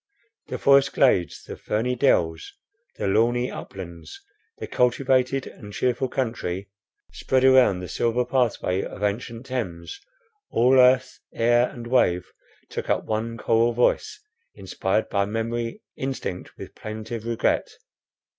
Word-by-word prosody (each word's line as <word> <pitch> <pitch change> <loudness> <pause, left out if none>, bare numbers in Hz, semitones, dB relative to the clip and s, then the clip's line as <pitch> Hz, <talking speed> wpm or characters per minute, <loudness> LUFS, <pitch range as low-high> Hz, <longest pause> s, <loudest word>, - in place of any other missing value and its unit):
The - - -4
forest 140 0 +4
glades, 95 - +2
the - - -8
ferny 120 +4 -1
dells, 80 - +1 0.4
and 100 -2 0
lawny 120 +2 +2
uplands, 85 -4 -9 0.4
the - - -5
cultivated 130 +1 +1
and 105 -3 -11
cheerful 125 +4 0
country 100 -7 -3 0.4
spread 130 -1 0
around 130 -8 +5
the 90 - -6
silver 120 +4 0
pathway 120 -7 0
of - - -7
ancient 115 +3 -3
Thames, 90 -11 -5 0.5
all 130 +3 +4
earth, 130 0 +4 0.2
air, 120 +1 +3
and 120 -1 -9
wave, 90 -8 +2 0.4
took - - -6
up - - +1
one 115 +1 -2
choral 115 +1 +2
voice, 120 +1 +1 0.4
inspired 95 +2 -1
by 100 -1 0
memory, 115 +2 -3
instinct 130 -9 -5
with - - -9
plaintive 110 +1 -6
regret. 115 -1 0
115 Hz, 125 wpm, -24 LUFS, 100-125 Hz, 0.5 s, around